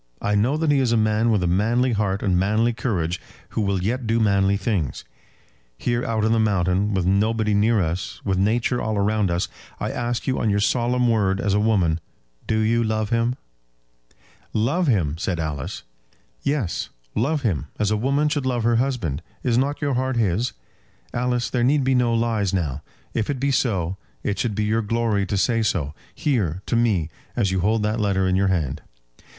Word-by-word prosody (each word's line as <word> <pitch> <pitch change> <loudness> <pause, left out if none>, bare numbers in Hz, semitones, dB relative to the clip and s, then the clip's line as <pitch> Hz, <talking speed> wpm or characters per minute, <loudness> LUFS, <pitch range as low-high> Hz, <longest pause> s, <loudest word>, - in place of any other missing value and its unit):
I 105 - -1
know 115 +9 +2
that 155 -1 +1
he 140 - +3
is 130 -3 +2
a 120 - +3
man 110 +1 +2
with 105 -5 +2
a - - +1
manly 115 +8 +2
heart 100 -2 0
and 95 -3 +2
manly 110 +6 +2
courage, 90 -8 -2 0.3
who - - -2
will 100 -3 0
yet 120 +4 -1
do 115 +1 +2
manly 100 -2 +3
things. 95 - -2 0.7
Here 120 0 -1
out 110 -2 0
on 110 - +2
the 115 - +3
mountain, 100 -1 +1
with 95 -2 0
nobody 105 +3 +2
near 105 +2 +3
us, 85 +1 -2
with 95 -2 +1
Nature 115 +5 +1
all 110 -2 -1
round 105 -1 +1
us, 85 +1 0 0.3
I - - -2
ask 120 0 -2
you 130 - 0
on 110 - +1
your 100 0 +2
solemn 125 +3 +2
word 100 -4 +2
as 100 0 0
a 105 - +3
woman, 95 -7 +2 0.5
do 110 - +1
you 115 +2 +2
love 110 -1 -1
him?" 115 +1 +1 1.2
"Love 140 +11 +1
him!" 80 - +1
said 90 -1 -2
Alice. 75 -4 -4 0.6
"Yes; 140 - -1 0.2
love 140 +6 0
him: 85 - -1
as 105 0 +1
a - - +3
woman 140 +7 +1
should 145 -3 -1
love 120 -3 0
her 115 0 +3
husband. 115 - -1 0.2
Is 120 -2 +1
not 140 +4 0
your 140 -1 +1
heart 130 +1 0
his? 110 +2 +1 0.6
Alice, 125 0 0
there 120 -2 0
need 140 +3 +3
be 130 +1 +2
no 125 -2 +3
lies 115 -4 +1
now. 75 -6 -2 0.3
If 110 - -1
it 140 -3 -1
be 140 +2 +1
so, 95 -9 0 0.3
it 100 - -2
should 115 -4 -1
be 105 - 0
your 110 +2 +1
glory 110 -2 0
to 100 - -1
say 115 +3 +2
so, 80 -9 -1 0.2
here, 100 - 0
to - - -1
me, 100 -9 +1 0.2
as 100 -5 +1
you 95 - 0
hold 105 +4 +1
that 105 +2 0
letter 95 -3 +1
in 95 - +2
your 95 +1 +2
hand." 80 -6 -1
110 Hz, 200 wpm, -23 LUFS, 95-120 Hz, 1.2 s, he